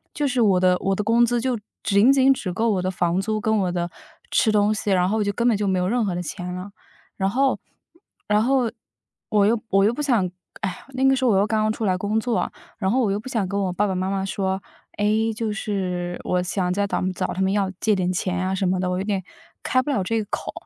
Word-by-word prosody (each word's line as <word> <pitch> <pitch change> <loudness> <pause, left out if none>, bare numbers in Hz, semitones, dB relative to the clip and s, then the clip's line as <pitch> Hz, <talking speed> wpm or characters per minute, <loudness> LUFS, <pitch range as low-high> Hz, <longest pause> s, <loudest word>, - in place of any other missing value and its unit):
就 295 -1 0
是 250 -2 +1
我 195 -4 +4
的 180 0 +4
我 195 0 0
的 210 - -2
工 230 +2 +4
资 240 0 +2
就 245 -2 -1 0.2
仅 205 +6 +5
仅 270 0 +5
只 195 -8 -4
够 225 +4 +1
我 185 -3 0
的 185 - -1
房 180 0 0
租 215 +1 -1
跟 220 +1 +1
我 180 -2 0
的 175 -1 -2 0.4
吃 220 - +3
东 210 0 +3
西， 210 -1 -3
然 180 -1 +3
后 220 +3 0
我 - - +2
就 205 - 0
根 235 +4 0
本 230 - +4
就 205 0 -1
没 190 -1 +1
有 180 - 0
任 240 +2 +1
何 180 -3 -1
的 180 - -2
钱 180 +3 -5
了。 185 +2 -7 0.5
然 195 -1 +1
后 270 +4 +1 0.7
然 210 +1 +3
后 255 -2 +2 0.6
我 205 -3 +3
又 225 +1 +2
我 195 0 +4
又 225 - +3
不 295 - -4
想 230 -11 +2 0.3
唉， 185 - -4
那 260 +1 -1
个 270 0 +5
时 260 0 0
候 235 - +4
我 195 - +3
又 200 - +3
刚 220 -1 +1
刚 215 0 +2
出 220 - -4
来 185 -1 +2
工 205 +3 -1
作， 235 0 -1 0.3
然 190 -3 0
后 260 +2 +2
我 205 -4 +1
又 200 - -1
不 235 - -10
想 220 -6 0
跟 200 +1 -2
我 185 -2 -1
爸 210 +3 +1
爸 190 - -1
妈 185 +1 -1
妈 195 -1 -1
说： 190 0 -2 0.4
“哎， 205 - 0 0.3
就 225 -2 -2
是 180 -4 -3
我 180 0 0
想 180 -1 -1
再 200 +1 0
找 - - -1
找 - - -1
他 190 - -3
们 190 0 +2
要 200 -2 +1
借 215 - +3
点 185 -1 0
钱 180 0 -1
啊 190 - 0
什 190 - -1
么 185 0 +1
的，” 185 - -1
我 180 - -1
有 - - -1
点 200 -2 -1 0.4
开 255 - +2
不 290 - -5
了 215 -9 +1
这 225 +4 0
个 - - -12
口。 - - -3
205 Hz, 290 characters per minute, -23 LUFS, 185-225 Hz, 0.7 s, 仅